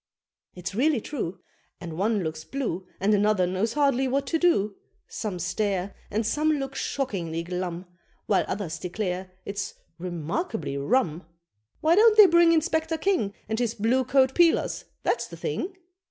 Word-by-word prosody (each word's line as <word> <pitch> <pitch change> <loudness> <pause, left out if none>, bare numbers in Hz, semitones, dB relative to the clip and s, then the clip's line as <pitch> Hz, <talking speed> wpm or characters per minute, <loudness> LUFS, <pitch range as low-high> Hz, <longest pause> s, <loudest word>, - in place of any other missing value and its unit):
It's 180 +2 -5
really 270 +5 +2
true: 195 - -5 0.4
And 170 -2 -7
one 205 +2 +1
looks 155 -1 -4
blue 195 -10 -3
And 200 +3 +2
another 205 -2 +3
knows 185 +5 -1
hardly 275 -3 +2
what 275 +2 0
to 325 - 0
do: 210 - +2 0.3
Some 210 -5 -4
stare, 195 +2 -1 0.2
and 215 +2 -1
some 305 +7 +2
Look 270 -2 -3
shockingly 180 - -2
glum, 180 0 -4 0.4
While 200 - +2
others 185 -5 -3
declare 185 0 -3 0.2
it's 200 -1 -4 0.2
"remarkably 175 - -3
rum." 165 - 0 0.5
"Why 315 +2 +4
don't 430 +3 +6
they 425 - +11
bring 340 -2 +6
Inspector 320 0 +1
King, 315 - 0
And 220 +1 -2
his 235 -2 0
blue 235 +5 +2
coat 260 +1 +3
'peelers?' 340 +1 +3 0.2
that's - - 0
the - - -10
thing?" 370 +2 -3
215 Hz, 155 wpm, -26 LUFS, 180-280 Hz, 0.5 s, they